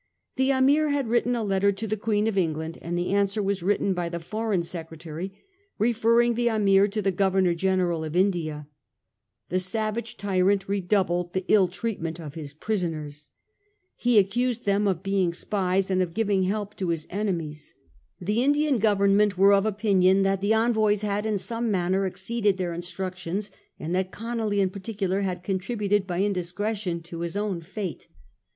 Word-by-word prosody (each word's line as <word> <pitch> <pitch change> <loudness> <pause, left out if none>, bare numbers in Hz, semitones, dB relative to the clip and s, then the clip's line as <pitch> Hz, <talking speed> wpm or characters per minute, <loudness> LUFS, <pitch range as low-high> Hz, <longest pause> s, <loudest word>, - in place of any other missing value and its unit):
The 265 +1 +2
Ameer 280 +3 +3
had 280 -5 0
written 240 +1 +2
a 230 - -1
letter 200 0 +2
to 205 +3 -5
the 215 0 -1
Queen 210 0 0
of 220 -2 0
England, 160 -3 -1
and 175 +1 -3
the 175 +1 -1
answer 200 +1 +1
was 195 -1 -1
written 200 +1 +1
by 175 -2 -2
the 170 0 -4
Foreign 210 +1 -1
Secretary, 165 +1 -6 0.5
referring 235 +1 +3
the 240 +1 0
Ameer 200 -3 +4
to 210 +1 -3
the 195 - +2
Governor 190 -1 +2
General 180 -2 0
of 155 +1 -5
India. 165 -6 0 0.8
The 185 - +1
savage 215 +4 -2
tyrant 195 0 +1
re 200 0 0
doubled 180 -2 0
the 185 -1 -2
ill 200 -4 +5
treatment 175 -4 -4
of 150 -4 -8
his 150 -3 -7
captives. 155 -5 -4 0.7
He 240 -2 +2
accused 235 +5 +1
them 200 +1 +2
of 185 -2 -1
being 195 -3 +1
spies 190 0 0
and 185 0 +2
of 175 -2 -2
giving 205 -3 +1
help 205 +1 -2
to 185 -3 -2
his 165 -2 -1
enemies. 170 -7 -3 0.4
The 210 +6 0
Indian 290 -2 +2
Government 200 -1 +3
were 195 +2 +6
of 200 +1 +3
opinion 195 -2 +3
that 195 0 +1
the 205 +2 +2
envoys 220 -2 +2
had 210 +1 -1
in 215 -2 0
some 230 +4 -2
manner 190 0 +1
exceeded 205 +1 0
their 180 -2 -2
instruc 180 +2 -5
tions, 190 +3 -4 0.3
and 160 +3 -4
that 185 0 0
Conolly 225 -3 -1
in 190 -1 +1
particular 195 -1 -2
had 180 -2 -3
contributed 200 +1 -1
by 180 0 -1
indiscretion 195 -1 -2
to 170 0 -8
his 170 +3 -3
own 205 -4 -1
fate. 190 +1 -6
195 Hz, 175 wpm, -26 LUFS, 180-215 Hz, 0.8 s, were